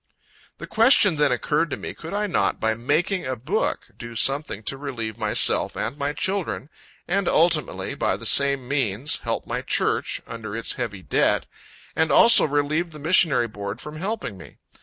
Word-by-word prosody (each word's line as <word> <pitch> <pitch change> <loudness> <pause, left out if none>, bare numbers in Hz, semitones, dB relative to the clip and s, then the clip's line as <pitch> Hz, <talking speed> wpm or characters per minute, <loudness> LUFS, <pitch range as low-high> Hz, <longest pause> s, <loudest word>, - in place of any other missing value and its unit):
The - - -8
question 220 - +5
then 150 -2 +3
occurred 150 +6 0
to 130 - -4
me, - - -6
Could 165 0 -10
I 210 +1 -1
not, 100 - 0
by 110 0 +1
making 150 - -1
a 130 - -2
book, 150 - -2
do 120 -1 -9
something 135 -3 -1
to 135 - -3
relieve 125 -6 -5
myself - - +2
and 115 +5 -3
my 145 0 -2
children, 185 -4 -3 0.4
and 190 +1 0
ultimately, 155 - +1
by 95 - -1
the 115 - -9
same 140 +1 +3
means, 130 -2 0
help - - -3
my - - -3
church, - - 0
under 110 -2 -7
its 115 - -1
heavy 100 -2 -5
debt, - - +1 0.5
and 160 -1 +1
also 230 - +7
relieve 150 +3 0
the 155 - -12
Missionary 155 -5 +3
Board 105 0 -7
from 150 +2 -8
helping 190 - -4
me. 80 - -14
145 Hz, 175 wpm, -23 LUFS, 115-165 Hz, 0.5 s, also